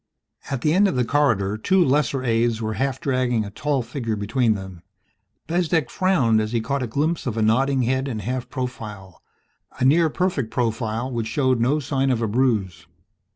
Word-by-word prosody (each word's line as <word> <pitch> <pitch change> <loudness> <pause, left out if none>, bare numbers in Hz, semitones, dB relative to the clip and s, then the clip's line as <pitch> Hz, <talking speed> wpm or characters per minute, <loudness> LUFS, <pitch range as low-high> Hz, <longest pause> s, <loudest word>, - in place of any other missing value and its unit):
At 135 -3 -3
the 150 - +2
end 200 +3 +4
of 190 - -1
the 125 -1 +1
corridor 110 -8 +1
two 185 +9 +3
lesser 135 -1 +1
aides 115 -1 +1
were 110 -1 -2
half 135 +2 -1
dragging 125 -7 0
a 100 - -8
tall 140 +3 -1
figure 115 -2 -3
between 110 +2 +1
them. 95 -3 -8 0.6
Bezdek 165 -5 0
frowned 130 -13 +2
as 110 +2 -3
he 115 - +2
caught 135 +5 -2
a 125 - -2
glimpse 150 +6 -1
of 115 -2 -2
a 110 - +1
nodding 130 +4 +2
head 130 +3 0
in 120 -5 -3
half 125 +3 -4
profile 105 - -6 0.6
a - - +2
near 160 +4 +4
perfect 165 - -1
profile 115 +1 -2
which 115 -2 -2
showed 130 +1 +1
no 130 +6 +2
sign 135 -1 0
of 125 -3 +1
a - - +1
bruise. 105 -6 0
125 Hz, 190 wpm, -23 LUFS, 110-140 Hz, 0.6 s, end